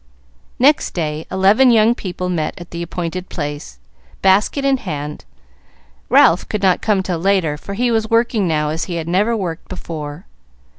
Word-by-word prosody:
Next 285 +4 +3
day 155 -2 -3
eleven 200 +7 +4
young 225 0 +5
people 180 -4 -5
met 165 -4 -2
at 175 - -11
the 170 - -5
appointed 175 +1 -5
place, 145 -2 -6 0.5
basket 205 +9 +3
in 275 -1 +3
hand. 150 - -6 0.8
Ralph 165 +2 +4
could 210 -2 -3
not 185 -2 +3
come 205 -3 +1
till 180 -3 -2
later, 185 -4 +1
for 200 +6 -8
he 245 +3 +1
was 220 -1 0
working 230 -3 +2
now 150 -2 0
as 160 +2 -2
he 170 -3 -3
never 200 +8 +1
worked 175 -5 -5
before. 155 -3 -7
185 Hz, 160 wpm, -18 LUFS, 165-215 Hz, 0.8 s, young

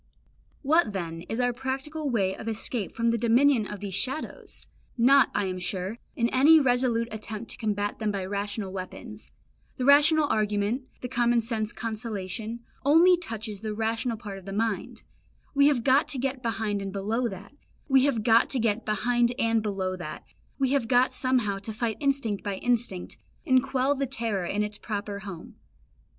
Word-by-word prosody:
What 300 -5 +3
then 165 -3 -4
is 225 - -2
our 245 0 +2
practical 270 +4 -4
way 195 -6 +1
of 220 - -9
escape 225 -1 -3
from 230 0 +1
the 230 - 0
dominion 240 0 +3
of 205 -1 -7
these 200 -2 -5
shadows? 270 - -3 0.3
Not, 265 +3 +6
I 205 - +1
am 185 -1 -3
sure, 185 +5 -3 0.2
in 235 - +2
any 295 +5 +6
resolute 245 -3 +1
attempt 215 +1 -6
to - - -7
combat 205 -2 -2
them 215 -2 0
by 195 -2 -3
rational 200 0 -4
weapons; 210 +4 -8 0.5
the 255 - -1
rational 295 +2 +6
argument, 215 +4 0
the 250 - -3
common 240 -1 +2
sense 225 -1 -2
consolation, 220 0 -4 0.2
only 330 +6 +6
touches 220 - -6
the 215 -1 -4
rational 225 +2 -1
part 205 -3 -7
of 185 - -17
the 195 - -6
mind; 220 0 -2 0.5
we 280 0 +5
have 270 -6 +2
got 275 +4 +4
to 285 - -2
get 265 0 -2
behind 220 -4 -1
and 195 0 -4
below 215 +5 -1
that, 200 +3 -9 0.3
we 270 -2 +5
have 245 -7 0
got 230 +3 +4 2.7
somehow 245 -7 +1
to 215 +2 -6
fight 220 -1 -2
instinct 275 -8 0
by 200 -2 -2
instinct, 230 -4 -1 0.3
and 260 -1 +4
quell 270 +1 +1
the 275 -1 -2
terror 220 -6 -2
in 205 +4 0
its 210 0 -5
proper 205 -2 -4
home. 190 -5 -9
225 Hz, 160 wpm, -27 LUFS, 205-255 Hz, 2.7 s, Not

